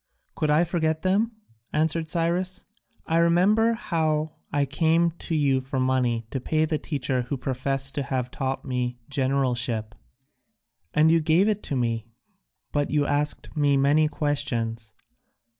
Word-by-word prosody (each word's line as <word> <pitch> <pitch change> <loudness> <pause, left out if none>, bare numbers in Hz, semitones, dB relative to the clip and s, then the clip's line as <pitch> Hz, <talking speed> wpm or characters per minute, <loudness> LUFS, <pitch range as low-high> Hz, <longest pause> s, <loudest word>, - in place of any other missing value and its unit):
"Could 155 - -1
I 150 +3 +4
forget 160 -2 -1
them?" 205 +5 +1 0.4
answered 160 +1 0
Cyrus. 175 +3 -1 0.4
"I 165 +1 +2
remember 195 +7 +4
how 160 -8 -1 0.2
I 145 -1 +1
came 165 +4 +2 0.2
to 165 - +1
you 140 -3 +2
for 130 +1 -3
money 125 -3 +1
to 135 - -2
pay 155 +5 +1
the 155 -1 -1
teacher 135 -4 -1
who 140 - -1
professed 135 +1 -1
to 145 - -2
have 125 -2 -2
taught 135 0 -3
me 125 -2 -2
generalship, 125 -5 0 1.0
and 155 +1 +4
you 165 0 +4
gave 165 +6 +3
it 210 -1 -1
me, 115 -4 -1 0.6
but 145 0 0
you 145 -1 +1
asked 145 +3 -1
me 145 -2 +3
many 145 +3 +4
questions. 120 -7 -2
145 Hz, 140 wpm, -25 LUFS, 130-165 Hz, 1.0 s, I